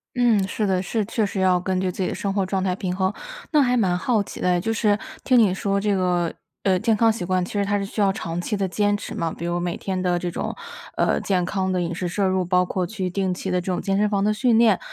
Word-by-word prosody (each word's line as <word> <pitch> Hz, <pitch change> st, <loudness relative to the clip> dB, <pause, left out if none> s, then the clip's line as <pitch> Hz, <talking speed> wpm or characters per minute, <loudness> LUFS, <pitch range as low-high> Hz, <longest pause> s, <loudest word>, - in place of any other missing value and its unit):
嗯， 235 Hz, -5 st, +3 dB
是 210 Hz, +2 st, -1 dB
的， 185 Hz, -2 st, +1 dB
是， 210 Hz, +2 st, -1 dB
确 225 Hz, 0 st, -1 dB
实 200 Hz, -1 st, -2 dB
要 185 Hz, -1 st, +3 dB
根 185 Hz, +1 st, -1 dB
据 185 Hz, -1 st, 0 dB
自 185 Hz, -, -6 dB
己 185 Hz, -, 0 dB
的 -, -, -4 dB
生 200 Hz, -1 st, -2 dB
活 195 Hz, -1 st, +1 dB
状 190 Hz, 0 st, -1 dB
态 185 Hz, -1 st, 0 dB
平 180 Hz, -1 st, -3 dB
衡， 190 Hz, +1 st, 0 dB, 0.4 s
那 300 Hz, -2 st, +5 dB
还 250 Hz, -1 st, +2 dB
蛮 190 Hz, -6 st, +2 dB
好 210 Hz, +3 st, +1 dB
奇 -, -, -9 dB
的 180 Hz, -, +2 dB
哎， 180 Hz, -, +3 dB
就 225 Hz, +5 st, -1 dB
是 210 Hz, -2 st, +2 dB, 0.3 s
听 255 Hz, -2 st, +4 dB
你 210 Hz, -5 st, +5 dB
说 200 Hz, +1 st, 0 dB
这 205 Hz, 0 st, +1 dB
个， 180 Hz, -2 st, 0 dB, 0.3 s
呃， 185 Hz, -2 st, +3 dB
健 220 Hz, -1 st, +2 dB
康 225 Hz, 0 st, +4 dB
习 215 Hz, -, -5 dB
惯， 185 Hz, 0 st, 0 dB
其 -, -, -10 dB
实 205 Hz, -1 st, +1 dB
它 205 Hz, +1 st, 0 dB
是 200 Hz, -, -2 dB
需 210 Hz, -, -3 dB
要 195 Hz, -1 st, +4 dB
长 170 Hz, -2 st, -4 dB
期 210 Hz, +4 st, -2 dB
的 195 Hz, -1 st, 0 dB
坚 205 Hz, +3 st, +1 dB
持 -, -, -7 dB
嘛， 165 Hz, -1 st, -2 dB
比 170 Hz, -, -6 dB
如 175 Hz, 0 st, -1 dB
每 175 Hz, 0 st, -2 dB
天 190 Hz, -1 st, -3 dB
的 180 Hz, -1 st, +1 dB
这 175 Hz, 0 st, -3 dB
种， -, -, -4 dB, 0.4 s
呃， -, -, +2 dB
健 185 Hz, -3 st, 0 dB
康 190 Hz, 0 st, -1 dB
的 185 Hz, -, 0 dB
饮 170 Hz, 0 st, -3 dB
食 180 Hz, +1 st, -3 dB
摄 195 Hz, +3 st, 0 dB
入， 185 Hz, 0 st, +1 dB
包 180 Hz, +1 st, +2 dB
括 180 Hz, -1 st, -2 dB
去 190 Hz, -2 st, -3 dB
定 190 Hz, +1 st, -1 dB
期 185 Hz, +1 st, -3 dB
的 180 Hz, 0 st, +1 dB
这 -, -, -13 dB
种 180 Hz, -, -1 dB
健 195 Hz, -2 st, 0 dB
身 210 Hz, -, +2 dB
房 200 Hz, -1 st, +1 dB
的 215 Hz, -, +2 dB
训 230 Hz, +1 st, +3 dB
练。 225 Hz, -5 st, +5 dB
190 Hz, 315 characters per minute, -23 LUFS, 180-205 Hz, 0.4 s, 那